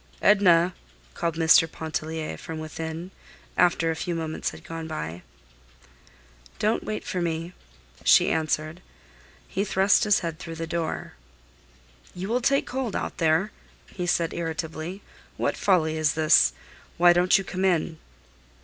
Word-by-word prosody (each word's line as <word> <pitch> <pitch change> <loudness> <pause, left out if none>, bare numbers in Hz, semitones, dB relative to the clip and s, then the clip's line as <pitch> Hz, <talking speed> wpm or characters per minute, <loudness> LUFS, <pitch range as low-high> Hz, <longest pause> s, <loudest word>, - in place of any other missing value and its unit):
"Edna!" 180 -4 +5 0.4
called 165 - -2
Mr. 165 0 +5
Pontellier 160 0 -4
from 160 - -7
within, 160 +3 -6 0.4
after 175 -2 +3
a - - -3
few 170 +2 -3
moments 160 -1 -3
had - - -12
gone 165 -1 -6
by. 85 - -5 1.4
"Don't 215 +2 0
wait 215 - -4
for 180 - -2
me," 165 +1 -3 0.5
she - - +5
answered. 155 +1 -1 0.7
He 195 - -1
thrust 195 +2 +3
his 210 -1 +3
head 165 -1 -4
through 165 -2 -7
the 165 0 -4
door. 165 0 -3 1.0
"You 185 +3 -5
will 245 +2 +1
take 275 +3 +2
cold 255 -5 -3
out - - -4
there," 165 +5 +2 0.3
he 180 -2 -5
said, 170 -2 +1
irritably. 165 +2 -5 0.3
"What - - 0
folly 160 -5 +2
is 155 -1 +1
this? 155 -1 +5 0.4
Why 175 0 +7
don't 180 +1 +4
you 195 - -3
come 185 0 -4
in?" 170 -3 +1
165 Hz, 140 wpm, -25 LUFS, 160-185 Hz, 1.4 s, Why